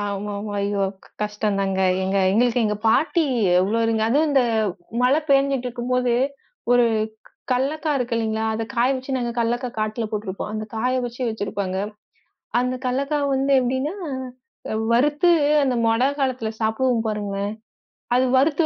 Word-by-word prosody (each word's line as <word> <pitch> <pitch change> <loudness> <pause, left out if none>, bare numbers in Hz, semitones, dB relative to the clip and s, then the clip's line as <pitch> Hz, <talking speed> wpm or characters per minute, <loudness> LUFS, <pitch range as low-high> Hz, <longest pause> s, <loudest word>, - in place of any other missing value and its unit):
ஆமாமா. 205 +1 -4
ஐயோ! 200 0 0 0.4
கஷ்டம்தாங்க. 200 -2 -1 0.2
எங்க 190 +1 0
எங்களுக்கு 240 +2 +2
எங்க 210 0 -1
பாட்டி 320 +7 +3 0.4
எவ்ளோ 205 +5 +1 0.3
அதுவும் 300 +6 +3
இந்த 270 -2 +4 0.6
மழை 270 +5 +4
பெய்ஞ்சிட்டுருக்கும்போது 250 -2 +1 0.6
ஒரு 245 0 +5 0.7
கல்லக்காய் 290 +4 0
இருக்கு 245 -1 -2
இல்லீங்களா, 220 -1 -1
அத 225 - -2
காய 240 +1 +3
வச்சு 265 +1 -3
நாங்க 240 -2 -2
கல்லக்காய் 240 +1 -1
காட்டுல 215 +2 -1
போட்டுருப்போம். 205 -2 -4
அந்த 215 0 -3
காய 250 +3 0
வச்சு 245 +1 -5
வச்சிருப்பாங்க. 200 -3 -3 0.8
அந்த 250 +1 0
கல்லக்காய் 280 +3 0
வந்து 270 +1 +1
எப்படின்னா, 260 +5 -1 0.8
அ - - -1 0.2
வறுத்து 295 +8 +3 0.3
அந்த 260 -2 +1
மழை 225 +2 +2 0.2
காலத்துல 255 -5 -1
சாப்பிடுவோம் 225 +1 +1
பாருங்க. 205 -2 -3 0.8
அது 255 +1 +4
வறுத்து 300 +4 +3
240 Hz, 130 wpm, -22 LUFS, 215-260 Hz, 0.8 s, ஒரு